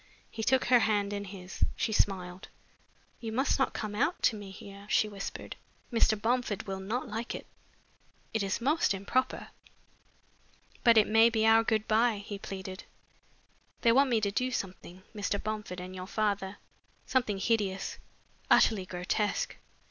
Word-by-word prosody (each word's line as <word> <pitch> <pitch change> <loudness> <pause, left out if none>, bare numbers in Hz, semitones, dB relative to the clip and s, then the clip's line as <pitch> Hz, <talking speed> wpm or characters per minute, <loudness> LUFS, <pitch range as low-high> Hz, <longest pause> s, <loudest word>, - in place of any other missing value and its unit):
He 225 - -5
took 260 +3 +3
her 245 0 +6
hand 205 -2 +1
in 205 0 -3
his. 190 -1 -5
She 220 - -1
smiled. 185 -3 0 0.7
"You 225 -2 -5
must 265 +5 +1
not 265 - +1
come 215 -1 -3
out 285 +11 0
to 225 - +4
me 205 -2 -8
here," 200 +1 -11
she 215 - +3
whispered. 200 -2 -7 0.4
"Mr. 220 -2 +3
Bomford 230 -2 0
will 195 -1 -4
not 220 +7 -3
like 225 +2 -4
it. - - -7 0.9
It 220 - +1
is 195 0 -1
most 280 -2 +2
improper." 235 +7 -1 1.3
"But 235 -2 +6
it 215 - +7
may 225 +2 +6
be 220 -1 +1
our 225 0 +6
good 220 -1 0
bye," 225 0 +3
he 205 -2 -6
pleaded. 190 -1 -7 1.0
"They 230 - +5
want 270 +3 +4
me 235 -3 +3
to 200 -1 0
do 255 +5 0
something, 185 -5 -6
Mr. 205 -1 -1
Bomford 210 -4 -4
and 185 +1 -7
your 185 0 -6
father, 200 -2 -1 0.5
something 240 -6 +1
hideous, 195 -2 -1 0.5
utterly 195 -4 +4
grotesque. 185 +4 -1
210 Hz, 155 wpm, -30 LUFS, 195-230 Hz, 1.3 s, it